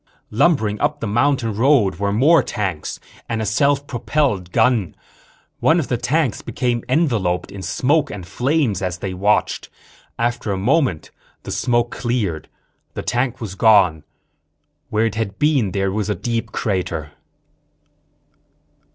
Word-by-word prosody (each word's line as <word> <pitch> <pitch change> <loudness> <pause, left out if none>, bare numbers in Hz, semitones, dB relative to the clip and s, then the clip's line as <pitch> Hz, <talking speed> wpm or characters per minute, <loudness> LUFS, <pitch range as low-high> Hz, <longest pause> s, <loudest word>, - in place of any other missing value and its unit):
Lumbering 110 -5 +2
up 150 - 0
the 115 - -3
mountain 120 +1 +1
road 120 -3 +3
were 100 0 -1
more 145 +11 +5
tanks 95 -9 -4 0.3
and 115 -1 -1
a 110 - -1
self 140 +6 +2
propelled 120 -8 -1
gun. 115 -6 +2 0.6
One 165 +2 +4
of 155 - -3
the 125 - +1
tanks 145 0 0
became 120 -2 -2
enveloped 115 - +1
in 100 - -8
smoke 140 - +1
and 95 -4 -7
flames 125 - 0
as 90 -2 -2
they 95 +1 -4
watched. 100 +3 0 0.5
After 120 -2 -1
a 95 - -1
moment 120 - +1 0.3
the - - -6
smoke 120 -1 0
cleared. 110 -10 -2 0.5
The - - -4
tank 125 0 -1
was 110 -5 -5
gone; 95 -7 +4 0.9
where 110 +1 +1
it 115 - -1
had 110 -2 -3
been 145 -9 +2
there 95 0 0
was 105 +1 -2
a 105 - 0
deep 115 +3 -3
crater. 90 -10 -2
115 Hz, 140 wpm, -20 LUFS, 100-130 Hz, 0.9 s, more